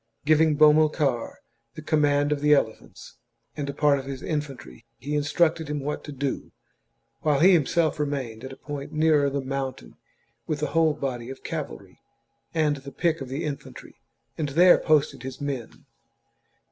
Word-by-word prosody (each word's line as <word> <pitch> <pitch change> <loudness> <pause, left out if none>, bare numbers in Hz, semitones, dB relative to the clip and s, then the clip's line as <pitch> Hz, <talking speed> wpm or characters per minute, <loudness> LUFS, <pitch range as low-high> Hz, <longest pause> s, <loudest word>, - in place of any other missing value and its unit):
Giving 155 0 +4
Bomilcar 150 -4 +3 0.4
the 155 - -8
command 145 -2 +2
of 145 -1 0
the 150 0 +5
elephants 110 -5 -4 0.4
and 140 -1 -4
a - - -3
part 145 -1 +3
of 135 - -8
his 135 -1 -6
infantry, 135 - -5
he 145 +3 -5
instructed 160 +2 +1
him 150 0 -3
what 145 +2 -4
to - - -7
do, 140 -1 -4 0.7
while 150 -3 +1
he 185 +5 +6
himself 160 0 +2
remained 135 -6 -3
at 130 - -7
a - - -9
point 145 -1 -7
nearer 155 -2 +3
the 140 0 -2
mountain 135 0 -5 0.5
with 155 -2 -2
the 150 -1 -1
whole 160 -2 +3
body 125 -4 -4
of 135 - -9
cavalry - - -6 0.5
and 150 -3 +1
the 135 0 -10
pick 165 -2 0
of 135 - -6
the 135 +5 -4
infantry, 145 -3 -8 0.4
and 150 -2 -1
there 175 +6 +6
posted 145 -4 +1
his 130 0 -7
men. 140 -5 -5
145 Hz, 165 wpm, -25 LUFS, 135-155 Hz, 0.7 s, he